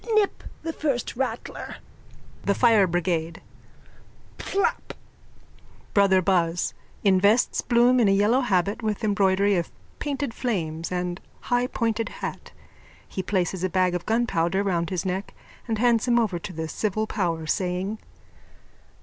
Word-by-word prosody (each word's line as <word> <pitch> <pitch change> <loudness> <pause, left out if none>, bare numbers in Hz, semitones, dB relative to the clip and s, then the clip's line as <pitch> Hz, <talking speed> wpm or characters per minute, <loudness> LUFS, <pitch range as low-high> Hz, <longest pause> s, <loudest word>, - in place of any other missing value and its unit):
Nip 420 -2 +2 0.2
the 325 0 -3
first 275 -8 -2
rattler. 265 +2 -4 0.7
THE 200 - +1
FIRE 225 -6 +5
BRIGADE: 170 -1 -1 1.0
Pflaap! 395 - -1 1.0
BROTHER 190 -2 +4
BUZZ: 175 -2 +1 0.3
_(Invests 200 +4 +3
Bloom 245 +1 +5
in 225 - +4
a - - +4
yellow 210 +6 +3
habit 200 -1 0
with 215 -2 -2
embroidery 200 -1 +3
of 170 - -2 0.3
painted 285 -4 -2
flames 165 -11 -2
and 180 0 -2 0.2
high 245 0 +1
pointed 230 -2 -1
hat. - - -6 0.6
He 190 - -4
places 185 -1 -1
a 185 - +1
bag 185 0 +2
of 180 -1 -4
gunpowder 200 -5 +1
round 170 -4 0
his 185 -2 -2
neck 190 +2 -3 0.3
and 225 -2 -1
hands 235 +1 +3
him 240 -1 +4
over 210 -7 +1
to 180 - -7
the 160 -2 -4
civil 215 +6 -1
power, 170 -6 -2
saying.) 185 +5 -1
200 Hz, 135 wpm, -25 LUFS, 180-230 Hz, 1.0 s, FIRE